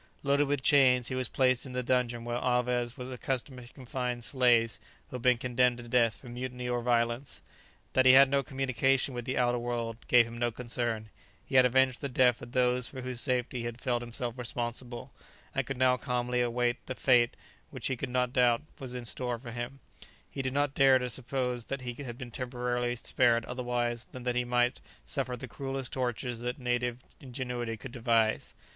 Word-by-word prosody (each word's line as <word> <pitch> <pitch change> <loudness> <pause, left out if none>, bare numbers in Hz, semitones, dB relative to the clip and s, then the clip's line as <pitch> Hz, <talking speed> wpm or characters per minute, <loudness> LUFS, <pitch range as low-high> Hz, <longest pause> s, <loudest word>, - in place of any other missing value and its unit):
Loaded 140 +1 +3
with 140 -2 -1
chains, 130 -4 +5
he - - -3
was 130 -2 -1
placed 130 -2 +2
in 130 - -8
the 125 0 -1
dungeon 120 -2 0
where 120 0 -2
Alvez 125 0 0
was 125 0 -6
accustomed 130 +1 -3
to - - -17
confine 125 -2 -4
slaves 120 -3 +3 0.3
who 125 - -4
had - - -10
been 125 0 +4
condemned 125 0 +2
to 120 -1 -9
death 115 -3 +3
for 100 - -14
mutiny 125 0 -5
or 120 0 0
violence. 120 +2 0 0.5
That 130 0 +4
he 130 - +9
had 135 +1 +9
no 140 +1 +2
communication 135 0 +1
with 120 -1 -5
the 130 - -2
outer 120 -1 +2
world 120 -1 -3
gave 120 -1 +6
him 115 +1 -8
no 120 0 +2
concern; 115 -2 -3 0.3
he - - -11
had 130 -1 +7
avenged 130 0 +2
the 140 - -3
death 125 -2 +3
of 120 +1 -10
those 125 -1 +2
for 130 - -8
whose 125 -2 -4
safety 125 -2 -1
he 115 - -4
had 120 0 -5
felt 120 -1 0
himself 120 +1 -5
responsible, 120 0 -4 0.4
and - - -1
could 135 - -4
now 125 0 +4
calmly 125 0 -1
await 120 0 0
the 130 - -4
fate 120 -3 +3 0.3
which - - -8
he 130 - +1
could 130 +2 -4
not 125 0 0
doubt 120 -3 +3 0.2
was 130 -3 -5
in 125 -1 -5
store 120 +1 -2
for 120 0 -9
him; 120 +3 -6 0.5
he 135 - -5
did 130 -1 -2
not 145 -1 +1
dare 135 -2 +6
to 125 -1 -2
suppose 125 -1 -2
that 135 -1 -4
he 125 -1 -4
had 120 -4 -6
been 125 -2 -8
temporarily 120 -1 -2
spared 120 -1 +2
otherwise 120 -1 -2
than 125 - -10
that 125 0 0
he 125 0 0
might 120 0 +1 0.2
suffer 125 - -1
the 130 - -7
cruellest 135 +1 -5
tortures 125 -2 -2
that 125 +1 -3
native 125 -2 -1 0.2
ingenuity 125 -3 -4
could 120 +4 -9
devise. 115 -2 +1
125 Hz, 200 wpm, -30 LUFS, 120-130 Hz, 0.5 s, he